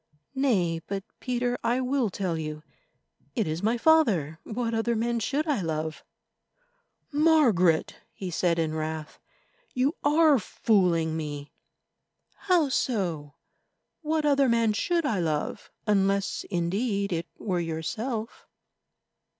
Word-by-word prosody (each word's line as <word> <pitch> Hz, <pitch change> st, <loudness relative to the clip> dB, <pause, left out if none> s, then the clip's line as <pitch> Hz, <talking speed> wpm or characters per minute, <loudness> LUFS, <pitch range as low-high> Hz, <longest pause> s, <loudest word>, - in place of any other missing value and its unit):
"Nay, 190 Hz, -12 st, +1 dB
but, 195 Hz, -1 st, -3 dB, 0.2 s
Peter, 245 Hz, 0 st, -1 dB
I 240 Hz, +2 st, +1 dB
will 260 Hz, -2 st, +1 dB
tell 185 Hz, -3 st, -2 dB
you. 155 Hz, -1 st, -5 dB, 0.7 s
It 225 Hz, -5 st, +1 dB
is 155 Hz, +2 st, -2 dB
my 225 Hz, +4 st, +1 dB
father—what 230 Hz, -, +2 dB
other 225 Hz, +1 st, +1 dB
man 235 Hz, +1 st, 0 dB
should 285 Hz, +7 st, -1 dB
I 295 Hz, -, 0 dB
love?" 160 Hz, -1 st, -3 dB, 1.1 s
"Margaret!" 275 Hz, -, +3 dB
he 185 Hz, -2 st, -6 dB
said 170 Hz, 0 st, +1 dB
in 160 Hz, -1 st, 0 dB
wrath, 155 Hz, 0 st, -4 dB, 0.6 s
"you 265 Hz, +6 st, +1 dB
are 300 Hz, -1 st, +5 dB
fooling 180 Hz, -6 st, +1 dB
me." 145 Hz, -2 st, -5 dB, 1.0 s
"How 350 Hz, -5 st, +4 dB
so? 175 Hz, -, -1 dB, 0.7 s
What 310 Hz, -1 st, 0 dB
other 280 Hz, -2 st, +4 dB
man 230 Hz, -2 st, +3 dB
should 335 Hz, +9 st, 0 dB
I 220 Hz, -9 st, 0 dB
love—unless, 195 Hz, +5 st, -1 dB
indeed, 200 Hz, +3 st, -1 dB
it 170 Hz, 0 st, -2 dB
were 185 Hz, -4 st, -1 dB
yourself?" 215 Hz, -, -4 dB
210 Hz, 115 wpm, -27 LUFS, 165-255 Hz, 1.1 s, are